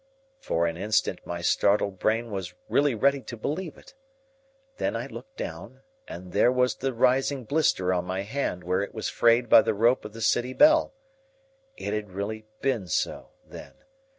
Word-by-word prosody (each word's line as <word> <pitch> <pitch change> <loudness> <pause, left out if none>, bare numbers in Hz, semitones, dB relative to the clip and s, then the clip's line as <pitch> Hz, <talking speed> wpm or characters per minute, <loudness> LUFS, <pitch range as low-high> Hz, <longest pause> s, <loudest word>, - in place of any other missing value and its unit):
For 85 +1 0
an 85 0 -2
instant 105 +4 0
my 85 0 -4
startled 100 +1 +2
brain 115 +1 0
was 90 -3 -5
really 140 -3 +2
ready 140 +5 +2
to 120 - -9
believe 155 - -4
it. - - -17 0.8
Then - - -1
I - - -3
looked - - -11
down, - - -7 0.3
and 90 +1 -9
there 105 +6 +4
was 125 0 +2
the 135 0 -2
rising 130 +2 +1
blister 110 -9 +1
on 90 -1 -1
my 95 +1 -3
hand 105 -5 -3
where 90 +2 0
it 100 - -6
was 110 - -3
frayed 120 +1 +3
by 110 - +8
the - - -1
rope 120 +5 +3
of 105 - -9
the 115 - -9
city 125 +3 +1
bell. 310 - +4 0.8
It - - -4
had 105 -1 -3
really 110 +3 -5 0.2
been 120 -9 0
so, 80 - -2 0.2
then. - - -12
110 Hz, 180 wpm, -26 LUFS, 95-130 Hz, 0.8 s, by